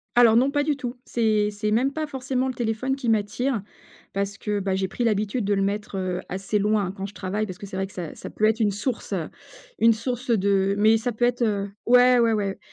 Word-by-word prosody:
Alors 235 -2 +6
non, 265 +4 +4
pas 290 0 +1
du 295 -1 +1
tout. 250 -2 -5
C'est 215 -3 +1
c'est 210 +1 -2
même 260 +5 +2
pas 315 0 -2
forcément 265 -2 -2
le - - -3
téléphone 240 +3 -1
qui 250 -3 -5
m'attire, 225 +3 0 0.5
parce 200 0 -2
que, 210 -1 -2
bah, 190 -1 -1
j'ai 190 -1 -1
pris 240 - -2
l'habitude 215 +1 0
de 205 - +1
le 195 - +1
mettre, 205 +1 -2
heu, 185 -1 -2
assez 195 +3 -2
loin 205 -2 +1
quand 195 0 -6
je 200 - -8
travaille 205 +3 -2
parce 185 -3 -8
que 200 - -8
c'est 190 - -7
vrai 190 0 -1
que - - -18
ça 170 -4 -6
ça - - -9
peut 215 - -6
être 220 +1 +4
une 210 -2 +2
source, 215 +5 -3
heu, - - -2 0.5
une 230 0 +6
source 245 +3 -4
de 195 -2 +2
mais 215 +2 +5
ça 240 +1 -2
peut 240 - -3
être, 245 0 +2
heu 200 -2 -1 0.2
ouais, 250 +1 +6
ouais, 230 -1 +3
ouais. 200 -2 -2
215 Hz, 245 wpm, -24 LUFS, 200-245 Hz, 0.5 s, Alors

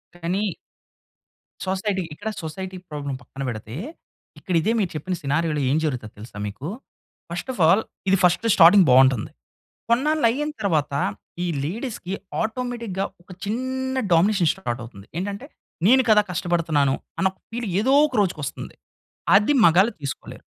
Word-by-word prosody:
కానీ 180 +3 -1 1.1
సొసైటీ. 190 0 -1
ఇక్కడ 220 - -5
society 185 +4 -6
problem 145 -3 -4
పక్కన 135 - -8
పెడితే, 110 0 -7 0.6
ఇక్కడ 185 -4 -2
ఇదే 215 - +1
మీరు 195 -4 0
చెప్పిన 180 +5 -2
సినారియోలో 150 +1 0
ఏం 145 - +3
జరుగుతుందో 125 -8 -3
తెలుసా 105 0 -10
మీకు? 110 +8 -7 0.6
ఫస్ట్ 175 +9 -5
ఆఫ్ 245 - -11
ఆల్ 195 +7 +5 0.3
ఇది 195 - +5
ఫస్ట్ 180 +5 +3
స్టార్టింగ్ 180 +2 +8
బాగుంటుంది. 130 -3 +5 0.6
కొన్నాళ్ళు 290 +5 +2
అయిన 295 +6 -1
తరువాత 155 -8 +1 0.5
ఈ - - 0 0.2
లేడీస్‌కి 200 - -4 0.3
ఆటోమేటిక్‌గా 230 -4 -3 0.2
ఒక 175 - -27
చిన్న 260 +4 -2
డామినేషన్ 175 0 +4
స్టార్ట్ 120 -11 -4
అవుతుంది. 100 -4 -12
ఏంటంటే 200 +7 -4 0.4
నేను 260 +2 +6
కదా 210 -1 +7
కష్టపడుతున్నాను. 160 -5 +1 0.2
అన్న 190 - +3
ఒక 190 - -31
ఫీల్ 235 0 -3
ఏదో 260 +5 +2 0.2
ఒక 265 - -7
రోజుకొస్తుంది. 155 -8 -3 0.6
అది 210 +8 +4
మగాలు 190 +7 +5
తీసుకోలేరు. 140 -2 -6
185 Hz, 135 wpm, -23 LUFS, 150-220 Hz, 1.1 s, స్టార్టింగ్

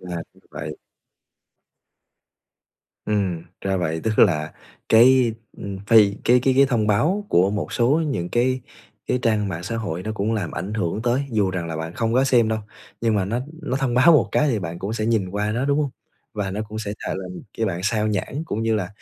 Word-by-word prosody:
Là 90 -2 -5 0.3
vậy. 75 0 -6 2.3
Ừm, 95 -6 -1 0.2
ra 95 -1 -1
vậy, 80 -2 -1
tức 110 -1 -1
là 75 -6 +3 0.4
cái, 120 +1 +6 0.2
ư, - - -11 0.2
phi 105 -3 +6
cái 125 +1 +5
cái 130 0 +2
cái 140 0 +6
thông 115 -5 +1
báo 175 - +1
của 95 +3 +3
một 105 0 -3
số 120 0 +2 0.2
những 90 -12 -2
cái 130 +2 +1 0.5
cái 125 - +1
trang 105 -3 +1
mạng 85 -2 -4
xã 115 +5 -3
hội 90 -6 -3
nó 110 - -3
cũng 110 +2 -1
làm 100 -7 -2
ảnh 105 +3 -5
hưởng 105 +1 -2
tới, 125 +3 +1
dù 105 -4 +1
rằng 90 -2 -3
là 80 -1 -4
bạn 80 +1 -5
không 115 -1 -1
có 130 +1 +4
xem 120 -4 +3
đâu, 110 0 0 0.4
nhưng 115 -2 +1
mà 100 -2 +1
nó 115 +5 -1 0.2
nó 130 - -1
thông 135 -3 -1
báo 130 +7 +6
một 150 - +4
cái 150 - +3
thì 115 -5 +1
bạn 85 -2 -5
cũng 100 +3 -4
sẽ 110 -1 -2
nhìn 110 -5 +1
qua 105 +1 -1
nó, 125 +4 -1
đúng 140 +1 +1
hông? 140 -3 -1 0.4
Và 100 -2 -2
nó 100 +3 -3
cũng 110 +1 -6
sẽ 105 -2 -4
chà - - -3
làm 90 -1 -7 0.2
cho 110 - +1
bạn 90 -2 -2
sao 105 +1 +1
nhãng 110 +9 -2
cũng 115 -8 -3
như 115 -1 +1
là 95 -4 -1
110 Hz, 220 wpm, -23 LUFS, 95-120 Hz, 2.3 s, cái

